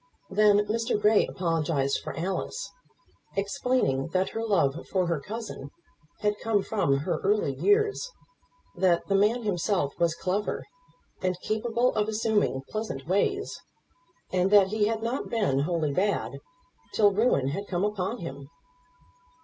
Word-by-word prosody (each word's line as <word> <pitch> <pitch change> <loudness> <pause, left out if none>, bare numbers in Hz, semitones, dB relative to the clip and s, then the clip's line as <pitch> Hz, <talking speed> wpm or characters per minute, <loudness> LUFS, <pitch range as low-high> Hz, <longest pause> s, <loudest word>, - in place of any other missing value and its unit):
Then 205 +1 +4
Mr. 225 +1 0
Grey 210 0 +4
apologized 160 -6 0
for - - -6
Alice, 190 - -3 0.6
explaining 200 - 0
that 185 0 +1
her 225 - -4
love 165 -9 +1
for 185 -2 +1
her 170 -3 0
cousin 210 -4 -7 0.5
had 210 0 0
come 215 -3 +1
from 170 -11 +1
her - - 0
early 205 -8 +1
years; 420 - +2 0.7
that 180 -3 +2
the 195 - -1
man 210 +5 +3
himself 180 -6 0
was 170 -1 +2
clever 195 +4 -2 0.6
and 185 -1 -1
capable 235 +3 0
of 210 -1 0
assuming 215 -10 0
pleasant 215 -11 -4
ways, 390 - 0 0.7
and 185 0 +2
that 200 -2 +6
he 210 0 +1
had 225 0 -2
not 235 +4 -2
been 205 - +1
wholly 155 -1 0
bad 200 +6 0 0.6
till 205 -2 +5
ruin 195 - +2
had 200 +8 -4
come 180 0 -1
upon 210 +2 -2
him. 140 - -8
200 Hz, 140 wpm, -27 LUFS, 170-220 Hz, 0.7 s, that